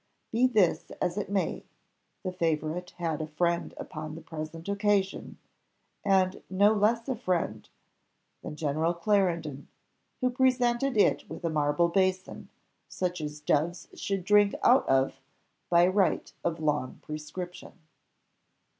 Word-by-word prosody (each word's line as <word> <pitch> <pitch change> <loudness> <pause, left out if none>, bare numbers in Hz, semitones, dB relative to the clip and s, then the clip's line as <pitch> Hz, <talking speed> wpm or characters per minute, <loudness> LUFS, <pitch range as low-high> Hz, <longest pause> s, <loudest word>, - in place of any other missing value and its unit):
Be 240 +3 +4
this 210 -9 +2
as 180 -1 0
it 205 - -3
may, 200 -1 -1 0.6
the 185 - -2
favourite 165 0 -1
had 165 -3 -2
a 155 - -3
friend 170 +2 0
upon 155 0 -6
the 165 - -9
present 160 +1 -7
occasion, 200 -1 0 0.7
and 190 -1 +2
no 200 +3 +4
less 225 +3 +2
a 260 - -1
friend 175 - -2 0.7
than - - -7
General 155 +2 0
Clarendon, 170 -7 0 0.5
who 255 -1 +1
presented 250 0 +2
it 205 - +3
with - - -7
a 165 - 0
marble 150 +2 +2
basin, 185 +1 -1 0.4
such 180 -2 -3
as 150 0 -5
doves 155 +4 0
should 195 -2 -3
drink 205 0 +4
out 255 +2 +5
of, 135 0 +2 0.5
by 175 0 +6
right 190 +1 +1
of 170 -1 -1
long 150 -4 -1
prescription. 155 +4 -7
180 Hz, 130 wpm, -28 LUFS, 155-200 Hz, 0.7 s, by